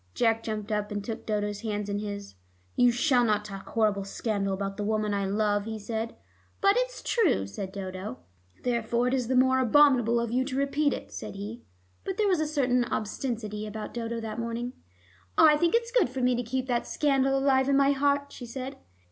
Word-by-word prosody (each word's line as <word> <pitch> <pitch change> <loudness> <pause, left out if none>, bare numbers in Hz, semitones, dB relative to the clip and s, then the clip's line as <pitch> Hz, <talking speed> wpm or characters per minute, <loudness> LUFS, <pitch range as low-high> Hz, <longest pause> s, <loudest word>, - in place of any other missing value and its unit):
Jack 225 -1 +2
jumped 215 -1 -4
up, 210 -1 -1
and 205 -1 -3
took 225 +1 -6
Dodo's 205 -1 -1
hands 210 -2 -3
in 205 0 -2
his. 205 -1 -6 0.4
"You 245 - +5
shall 245 +1 +3
not 210 -2 +1
talk 195 -2 -8
horrible 210 -3 +1
scandal 200 0 -2
about 195 +1 -3
the 210 - -3
woman 215 0 0
I 200 -1 0
love," 205 0 +1
he 220 0 -4
said. 220 +2 -4 0.4
"But 395 0 +5
it's - - -1
true," 370 - +2
said 190 - -6
Dodo. 185 -7 -6 0.5
"Therefore 240 0 +1
it - - -2
is 255 -3 0
the 260 - +1
more 260 +1 +4
abominable 250 -2 +5
of 235 -1 -2
you 255 +2 +2
to 260 -1 -3
repeat 280 +1 +1
it," - - -5
said - - -7
he. 210 +4 -6 0.4
But 385 -1 -4
there 425 - +2
was 370 -4 +3
a 310 - 0
certain 255 -5 +2
obstinacy 215 -2 -3
about 215 0 -6
Dodo 230 -1 -3
that 225 0 -5
morning. 235 +2 -3 0.6
"I 305 -1 +7
think 340 +6 +2
it's 470 0 0
good 485 - +3
for 260 +1 -4
me 250 0 +3
to 245 - 0
keep 255 +2 -2
that 245 -2 -1
scandal 270 -2 +2
alive 270 0 +3
in 275 - +4
my 280 0 +5
heart," 280 0 +1
she 245 - -9
said. 260 +2 -6
235 Hz, 205 wpm, -28 LUFS, 210-265 Hz, 0.6 s, I